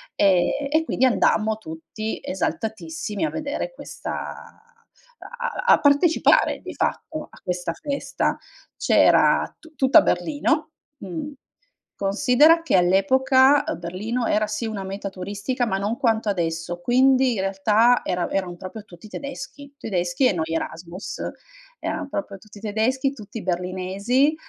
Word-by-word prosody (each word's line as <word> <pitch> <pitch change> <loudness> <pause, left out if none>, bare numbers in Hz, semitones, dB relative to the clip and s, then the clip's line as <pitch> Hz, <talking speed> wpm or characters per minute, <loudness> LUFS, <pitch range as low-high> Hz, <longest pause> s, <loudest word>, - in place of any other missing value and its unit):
Ehm, 195 +9 +2
e 315 +1 +3
quindi 260 - -1
andammo 220 -3 +2
tutti 225 -5 -6
esaltatissimi, 200 - -3
a - - -1
vedere 310 +11 -4
questa - - -7
a - - -10 1.1
a - - +7
a - - +4
partecipare 285 +4 +4
di - - -8
fatto 310 -1 -3
a - - -17
questa 180 -2 -2
festa. 280 - -2 0.4
C'era - - +4
tu 320 -1 -18
tutta 265 0 +6
Berlino, 310 +1 0 0.3
mhmm, 195 - -6 0.7
considera 270 +11 +4
che 330 - +1
all'epoca, 260 +10 +4
uhm, - - -2
Berlino 210 +8 -3
era 215 -1 +1
sì 215 +2 -3
una 210 -3 -4
meta 195 +1 -5
turistica, 205 +7 -3
ma 195 - 0
non 205 +4 -2
quanto 225 -5 +1
adesso, 170 -2 -2
quindi 260 +3 +4
in 195 - -1
realtà 210 +5 +3
era 180 -1 -1
erano 185 -3 -2
proprio 185 +4 -9
tutti 175 +1 -14
tedeschi. 280 +3 -8
Tedeschi 180 -1 -1
e 205 - +2
noi 160 -2 -1
Erasmus, 170 +3 -5 0.6
eran 285 - -4
proprio 200 -3 -5
tutti 210 0 -15
tedeschi, 235 +6 0
tutti 215 -4 -9
berlinesi, 190 - 0
215 Hz, 135 wpm, -23 LUFS, 190-270 Hz, 1.1 s, a